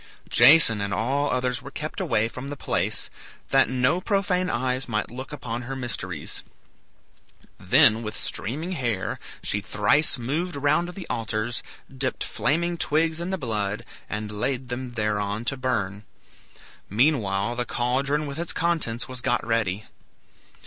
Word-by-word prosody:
Jason 120 -4 +7
and 100 -1 -1
all 135 +7 +1
others 125 -1 0
were - - -8
kept - - -5
away 110 0 +1
from 125 +3 -7
the 145 0 -5
place, 95 +3 0 0.4
that 135 -1 +5
no 130 +7 +2
profane 185 -3 +1
eyes 130 +2 -1
might 110 -1 -1
look 130 +3 -7
upon 120 -5 -4
her 135 +2 -5
mysteries. 125 -2 -4 1.2
Then, 110 +2 +5
with 110 -2 -4
streaming 150 - -2
hair, 120 - -1 0.2
she 105 - 0
thrice 125 +8 +3
moved 155 +8 -2
round 150 +5 +2
the 190 -4 -6
altars, 110 +1 -2 0.3
dipped 130 0 -1
flaming 170 +4 0
twigs 160 +2 +2
in 170 +2 -3
the 190 - -1
blood, 105 - -2 0.2
and 105 0 -3
laid 125 +4 -2
them 125 0 -4
thereon 105 0 -1
to 135 - 0
burn. 110 -6 -2 0.9
Meanwhile 110 -3 +2
the 125 0 -1
caldron 135 +6 0
with 140 +1 -5
its 170 - -1
contents 160 -9 0
was 130 -1 -5
got 120 - 0
ready. 110 -3 0
125 Hz, 145 wpm, -25 LUFS, 110-145 Hz, 1.2 s, Jason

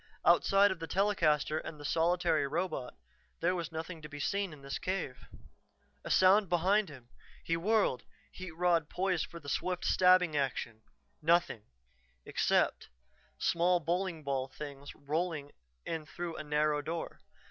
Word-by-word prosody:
Outside 200 +1 +5
of 190 - -4
the 165 - -5
telecaster 160 -7 +1
and 155 -1 -8
the 145 - -8
solitary 165 -1 +2
robot, 155 -4 -3 0.4
there 175 +2 +2
was 170 -2 -4
nothing 160 +1 -6
to 150 - -9
be 145 -1 -8
seen 200 +5 -1
in 145 -3 -13
this 140 0 -4
cave. 175 -9 -4 0.8
A - - -7
sound 190 +1 +5
behind 190 +3 +2
him. 130 -5 -13 0.3
He 165 - 0
whirled, 185 - +1 0.3
heat 185 -1 -8
rod 170 -2 +1
poised 185 -2 0
for 170 - -10
swift, 180 +5 -2
stabbing 180 -3 +4
action. 125 -5 -2 0.4
Nothing 160 -9 +2 0.6
except - - +1 0.5
small 175 +1 +2
bowling 170 0 -2
ball 135 -2 -1
things 140 0 -9
rolling 150 0 -3 0.3
in 160 -2 -4
through 170 0 -5
a - - -5
narrow 150 0 +1
door. 165 +3 -5
165 Hz, 145 wpm, -32 LUFS, 150-180 Hz, 0.8 s, Outside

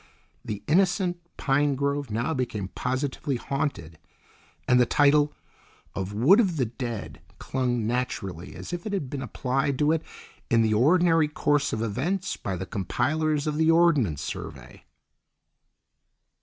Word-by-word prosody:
The 105 -2 -5
innocent 180 +2 +2 0.2
pine 140 +1 +2
grove 140 0 -1
now 115 +9 -1
became 110 -8 -3
positively 130 +3 -2
haunted, 120 - -3 0.7
and 125 - +5
the 120 - +3
title 145 +2 +4 0.6
of 95 +1 -4
"Wood 130 - +5
of 185 -8 +2
the 130 - +2
Dead" 120 -2 -6 0.2
clung 125 -4 -1
naturally 110 -7 -3
as - - -8
if 175 +3 -4
it 205 - -4
had 150 -10 -3
been 140 - -4
applied 135 +2 -1
to 150 +2 +3
it 160 -1 +1 0.5
in 115 -1 +4
the 110 -1 +2
ordinary 165 +6 +4
course 145 -1 +1
of 110 - -2
events 150 - -2
by 95 - -4
the 95 +1 -5
compilers 150 - -1
of 150 -1 -1
the 160 0 +3
Ordnance 150 - +3
Survey. - - -8
135 Hz, 140 wpm, -26 LUFS, 115-155 Hz, 0.7 s, and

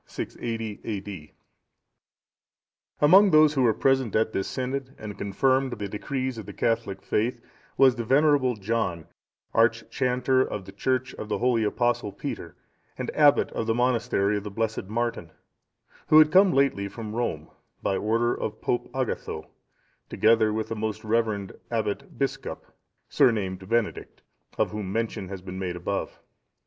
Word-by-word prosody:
[680 115 -3 -5
A.D.] 100 -7 -6 1.7
Among 190 +7 +7
those 155 -2 +6
who 135 - +1
were 120 -3 +5
present 130 -5 +1
at 110 0 +2
this 95 - -1
synod, 130 +1 -4
and 105 -1 -7
confirmed 130 +6 +1
the 105 -2 -4
decrees 130 +4 -3
of 105 - -9
the - - -7
Catholic 115 -4 -1
faith, 120 +3 0 0.4
was 130 -2 +6
the 120 - -3
venerable 135 0 +3
John,(652) 105 -4 -1 0.5
archchanter 130 0 +2
of 100 -3 -5
the 95 - -10
church 130 +5 -1
of 110 - -8
the - - 0
holy 120 -2 +2
Apostle 120 0 0
Peter,(653) - - -6 0.4
and - - -3
abbot 145 -2 +4
of 110 - -3
the 115 - +1
monastery 115 -4 +1
of 100 - -5
the 105 - -5
blessed 110 0 -2
Martin, 115 -4 -2 0.8
who 155 - +6
had 155 -1 +7
come 190 +2 +6
lately 135 -10 +2
from 105 +1 -7
Rome, 80 -11 -3 0.3
by 95 - +1
order 115 +4 +1
of 110 0 -4
Pope 120 - -1
Agatho, 130 -3 -3 0.6
together 110 -1 +3
with 110 0 -2
the 115 - -3
most 110 0 -3
reverend 110 -3 0 0.2
Abbot - - -3
Biscop, - - -3 0.4
surnamed 95 -5 +1
Benedict,(654) 115 -2 -4
of - - -6
whom 105 -3 -4
mention 110 -2 -2
has 95 -2 -7
been 95 0 -7
made 90 -2 -3
above. 90 +3 -4
115 Hz, 150 wpm, -26 LUFS, 105-130 Hz, 1.7 s, Among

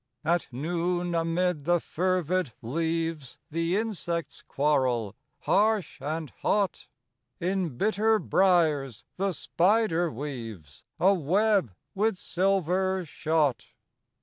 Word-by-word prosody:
At 170 +2 +1
noon 175 +5 -1
amid 165 -1 0
the 175 +1 +3
fervid 180 -4 -1
leaves 160 +1 -2
The 165 +4 0
insects 170 -9 -3
quarrel, 130 -7 0 0.3
harsh 215 -1 +1
and 155 0 -3
hot; 200 -3 0 0.5
In 180 -6 -1
bitter 220 - +2
briers 160 - +2
the 195 +1 0
spider 175 0 +1
weaves 115 - -7 0.2
A 195 +2 +5
web 190 - +1 0.2
with 210 0 +1
silver 190 -1 0
shot. 150 -4 0
170 Hz, 95 wpm, -27 LUFS, 150-190 Hz, 0.5 s, A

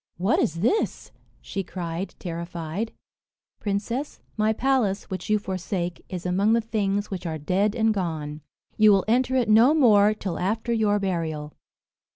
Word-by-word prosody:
"What 190 +7 +2
is 165 +1 0
this?" 395 - 0 0.3
she 195 - -4
cried, 175 0 -5
terrified. 170 +3 -4 0.7
"Princess, 220 +7 -3 0.2
my 215 0 +2
palace, 230 -5 +1
which 185 - -5
you 215 - +4
forsake, 185 -2 -4
is 180 -1 -6
among 195 +5 +2
the 230 - +4
things 205 -2 -1
which 180 -2 -4
are 160 -1 -3
dead 195 +8 0
and 225 -1 +2
gone. 155 -6 -3 0.4
You 215 -1 +7
will 195 - +2
enter 255 +3 +2
it 250 -3 +2
no 230 +8 +6
more 215 -7 +5
till 190 -4 -4
after 220 +5 -1
your 215 -2 +2
burial." 165 -6 -3
200 Hz, 155 wpm, -25 LUFS, 175-220 Hz, 0.7 s, You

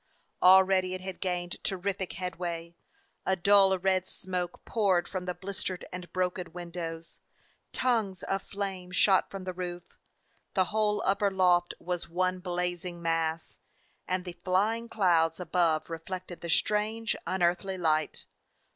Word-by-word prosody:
Already 185 0 +6
it 185 - -6
had 190 0 -6
gained 175 -1 -2
terrific 190 0 -2
headway; 170 -1 -4 0.5
a 190 - +2
dull 195 +1 +5
red 185 0 +1
smoke 180 -2 -4
poured 195 -6 +2
from 185 -2 -4
the 180 -1 -3
blistered 190 -1 -4
and 180 -1 -7
broken 180 -2 -2
windows; 170 -2 -6 0.5
tongues 220 -7 0
of 195 0 -1
flame 195 -3 -4
shot 190 +1 +4
from 195 -1 -6
the 185 0 -4
roof; 175 -1 -7 0.6
the 185 -2 +4
whole 210 -1 +2
upper 200 +1 +3
loft 180 -2 +3
was 175 -1 -3
one 185 +2 0
blazing 180 -1 -2
mass; 165 -1 -1 0.5
and 185 0 -1
the 175 -1 -6
flying 215 +6 +1
clouds 170 -6 +3
above 170 -2 +1
reflected 175 +2 -6
the 170 - -5
strange, 215 +5 +1
un 185 0 0
earthly 180 +2 +1
light. 155 -3 0
185 Hz, 140 wpm, -29 LUFS, 175-190 Hz, 0.6 s, Already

